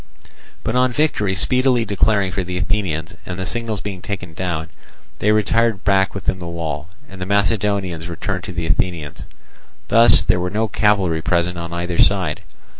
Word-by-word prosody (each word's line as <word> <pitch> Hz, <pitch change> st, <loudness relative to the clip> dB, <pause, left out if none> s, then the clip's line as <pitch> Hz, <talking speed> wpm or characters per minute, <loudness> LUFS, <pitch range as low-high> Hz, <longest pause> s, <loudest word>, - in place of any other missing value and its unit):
But 115 Hz, -, -2 dB
on 125 Hz, 0 st, +3 dB
victory 120 Hz, -9 st, +1 dB
speedily 125 Hz, +3 st, +2 dB
declaring 100 Hz, -1 st, +1 dB
for 95 Hz, 0 st, -2 dB
the 90 Hz, 0 st, -4 dB
Athenians 90 Hz, -4 st, -1 dB
and 90 Hz, -, -6 dB
the 95 Hz, -, -3 dB
signals 115 Hz, 0 st, -3 dB
being 95 Hz, -3 st, -6 dB
taken 95 Hz, -5 st, -5 dB
down, 80 Hz, -2 st, -3 dB, 0.5 s
they 105 Hz, -, +3 dB
retired 110 Hz, 0 st, +2 dB
back 95 Hz, -1 st, +2 dB
within 95 Hz, -1 st, -2 dB
the 85 Hz, -, -6 dB
wall; 80 Hz, -2 st, -4 dB, 0.2 s
and 95 Hz, -7 st, -11 dB
the 90 Hz, -, -3 dB
Macedonians 100 Hz, -4 st, 0 dB
returned 90 Hz, +2 st, -4 dB
to 100 Hz, -, -6 dB
the 85 Hz, -2 st, -3 dB
Athenians. 80 Hz, -2 st, -2 dB, 0.6 s
Thus 115 Hz, +2 st, +7 dB
there 90 Hz, -, +2 dB
were 90 Hz, 0 st, -1 dB
no 110 Hz, +3 st, 0 dB
cavalry 95 Hz, -6 st, +2 dB
present 85 Hz, +1 st, 0 dB
on 85 Hz, 0 st, -6 dB
either 85 Hz, 0 st, -3 dB
side. 95 Hz, -6 st, +2 dB
95 Hz, 170 wpm, -20 LUFS, 85-105 Hz, 0.6 s, Thus